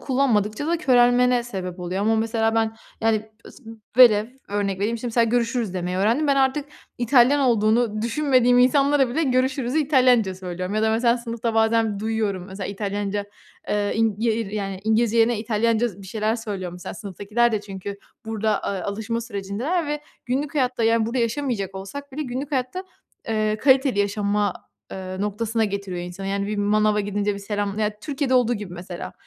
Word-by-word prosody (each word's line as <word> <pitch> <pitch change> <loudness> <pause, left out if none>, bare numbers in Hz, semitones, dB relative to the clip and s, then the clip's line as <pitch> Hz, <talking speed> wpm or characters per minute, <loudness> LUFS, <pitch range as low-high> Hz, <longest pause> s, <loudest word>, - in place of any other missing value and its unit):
kullanmadıkça 250 -2 0
da 340 +1 +1
körelmene 250 -4 +4
sebep 190 -6 -6
oluyor 180 +2 -3
ama, 220 +2 +2
mesela, 225 0 0
ben 225 0 0 0.2
yani, 220 -1 0 0.2
s 270 - -18 0.3
velev, 220 -4 +7 0.2
örnek 200 -2 -1
vereyim, 225 +3 0
şimdi, 245 - -5
mesela, 235 0 +2
görüşürüz 230 -3 0
demeyi 180 0 -2
öğrendim. 225 +10 +2
Ben 280 -1 +3
artık, 270 +2 +2 0.3
İtalyan 255 +3 +4
olduğunu 220 -3 +2
düşünmediğim 250 -1 +3
insanlara 275 +2 +4
bile, 270 +7 -1
görüşürüzü 260 0 +1
İtalyanca 255 -9 +3
söylüyorum. 185 +1 -5
Ya 215 - +1
da 220 - +3
mesela, 235 +2 +3
sınıfta 230 -1 -3
bazen 225 -2 +2
duyuyorum, 215 -4 -1
mesela, 195 0 -6
İtalyanca, 205 0 -3 0.4
eee, 205 -1 0
ing 225 -1 +2
ye 225 0 +1
ir, 225 -1 -2
yani, 195 -2 -4
İngilizce 220 +1 +2
yerine 225 0 +3
İtalyanca 225 +1 +1
z 200 -3 -12
bir - - -11
şeyler 215 +3 -1
söylüyor 200 -6 -5
mesela, 180 0 -8
sınıftakiler 210 +4 -1
de, 215 - 0
çünkü 200 0 -7 0.3
burada, 220 -2 0
eee, 195 -2 -2
alışma 220 +4 -3
sürecindeler 235 - -3
ve 295 0 -2 0.3
günlük 275 +4 -2
hayatta, 255 -4 0
yani 225 0 +3
burada 235 +3 -2
yaşamayacak 230 -5 -1
olsak 275 +9 -8
bile, 305 - -3
günlük 265 +2 -5
hayatta, 265 +8 -2 0.4
eee, 215 -1 0
kaliteli 265 -1 +3
yaşama, 205 0 +1 0.4
eee, 185 0 -6
noktasına 220 +2 -1
getiriyor 200 -3 -4
insanı. 180 +2 -7
Yani 200 0 -1
bir 210 +1 -3
manava 210 +1 +2
gidince, 205 0 -1
bir - - -6
selam 205 0 -3
ya 210 -1 -1
Türkiye'de 280 -2 -1
olduğu 245 -1 +3
gibi 205 -5 -7
mesela. 175 0 -7
220 Hz, 170 wpm, -23 LUFS, 205-245 Hz, 0.4 s, velev